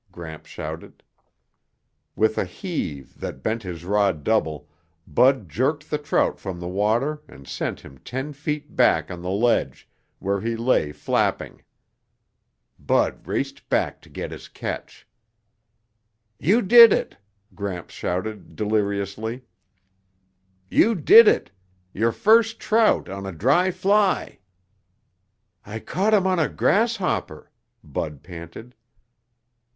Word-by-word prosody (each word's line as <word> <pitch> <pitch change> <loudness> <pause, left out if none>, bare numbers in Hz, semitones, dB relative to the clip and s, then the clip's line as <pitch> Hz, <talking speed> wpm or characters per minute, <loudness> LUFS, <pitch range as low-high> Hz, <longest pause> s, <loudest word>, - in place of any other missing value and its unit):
Gramps 80 -3 -10
shouted. - - -8 1.1
With 110 0 +2
a - - +2
heave 90 - -6
that 65 - -7
bent 110 +1 -1
his 85 -4 -7
rod 100 -6 +1
double, 80 -9 0 0.4
Bud 125 - +3
jerked 140 - -1
the 150 - 0
trout 145 - 0
from 95 -3 -6
the 85 - -6
water 115 +11 0
and 70 - -15
sent - - -4
him 65 - -14
ten 135 +4 -5
feet 150 +1 -5
back - - +3
on 90 -1 -7
the 90 - -4
ledge, 115 +5 0 0.3
where 100 0 -2
he 115 +1 -2
lay 115 -10 +1
flapping. - - -1 1.2
Bud - - 0
raced - - -4
back - - 0
to - - -19
get - - -6
his - - -9
catch. - - -7 1.3
"You 210 - +3
did 230 +2 +9
it!" - - -1 0.4
Gramps 95 -4 -6
shouted 100 +4 -4
deliriously. 105 +2 -2 1.2
"You 225 - +3
did 215 +7 +8
it! - - +2 0.4
Your 115 +3 +1
first 225 - +3
trout 220 0 +2
on 95 0 -6
a - - -4
dry 135 - +2
fly!" 195 +2 +1 1.2
"I 105 +2 -7
caught 200 - +1
him 195 -2 +2
on 185 -2 +2
a 160 - +1
grasshopper," 195 - 0 0.3
Bud 75 -3 -5
panted. 85 +7 -10
110 Hz, 125 wpm, -23 LUFS, -, 1.3 s, did